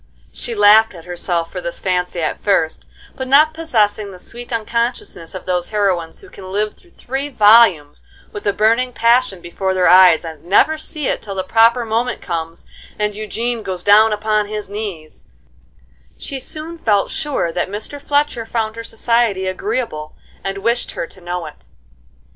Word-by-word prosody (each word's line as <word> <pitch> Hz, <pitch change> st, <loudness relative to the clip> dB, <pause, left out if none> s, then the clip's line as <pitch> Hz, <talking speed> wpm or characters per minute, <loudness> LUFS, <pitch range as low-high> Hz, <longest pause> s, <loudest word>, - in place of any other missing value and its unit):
She 235 Hz, -, -4 dB
laughed 210 Hz, 0 st, +6 dB
at 165 Hz, -1 st, -12 dB
herself 175 Hz, -1 st, -2 dB
for 180 Hz, -, -5 dB
this 170 Hz, -, -4 dB
fancy 180 Hz, -2 st, -1 dB
at 155 Hz, -, -3 dB
first; 165 Hz, -6 st, 0 dB, 0.3 s
but 260 Hz, -, -5 dB
not 300 Hz, +4 st, +5 dB
possessing 215 Hz, -10 st, 0 dB
the 190 Hz, -, -11 dB
sweet 240 Hz, +7 st, -10 dB
unconsciousness 230 Hz, -6 st, -3 dB
of 185 Hz, -, -7 dB
those 180 Hz, -1 st, -1 dB
heroines 190 Hz, -6 st, -1 dB
who -, -, -15 dB
can 185 Hz, -1 st, -10 dB
live 210 Hz, +2 st, -1 dB
through 355 Hz, -, -24 dB
three 270 Hz, +3 st, -4 dB
volumes 210 Hz, -, +5 dB, 0.3 s
with 205 Hz, -, -6 dB
a -, -, +4 dB
burning 230 Hz, +5 st, +1 dB
passion 235 Hz, -5 st, +2 dB
before 190 Hz, +3 st, -3 dB
their 185 Hz, -1 st, +3 dB
eyes, 180 Hz, -2 st, +6 dB
and 160 Hz, -2 st, -9 dB
never 200 Hz, -, +3 dB
see 310 Hz, -1 st, -4 dB
it -, -, -1 dB
till 200 Hz, -2 st, -7 dB
the 190 Hz, -, -2 dB
proper 230 Hz, +4 st, +3 dB
moment 230 Hz, +3 st, -1 dB
comes, 165 Hz, -2 st, -5 dB, 0.3 s
and 210 Hz, 0 st, -1 dB
Eugene 225 Hz, +3 st, -3 dB
goes 185 Hz, -3 st, -5 dB
down 215 Hz, +2 st, +6 dB
upon 215 Hz, 0 st, 0 dB
his 210 Hz, -1 st, -6 dB
knees, 195 Hz, -7 st, -7 dB, 0.9 s
she 275 Hz, -, -5 dB
soon 315 Hz, +5 st, -7 dB
felt 205 Hz, -8 st, +1 dB
sure 290 Hz, -, -1 dB
that 175 Hz, +2 st, -2 dB
Mr. 220 Hz, +8 st, -7 dB
Fletcher 285 Hz, -5 st, 0 dB
found 225 Hz, -1 st, -2 dB
her 230 Hz, -, -5 dB
society 230 Hz, -4 st, 0 dB
agreeable, 185 Hz, -, -3 dB, 0.3 s
and 195 Hz, 0 st, -3 dB
wished 235 Hz, +4 st, -1 dB
her -, -, -3 dB
to 185 Hz, -, -16 dB
know 175 Hz, -1 st, -4 dB
it. 150 Hz, -, -12 dB
210 Hz, 170 wpm, -18 LUFS, 180-235 Hz, 0.9 s, laughed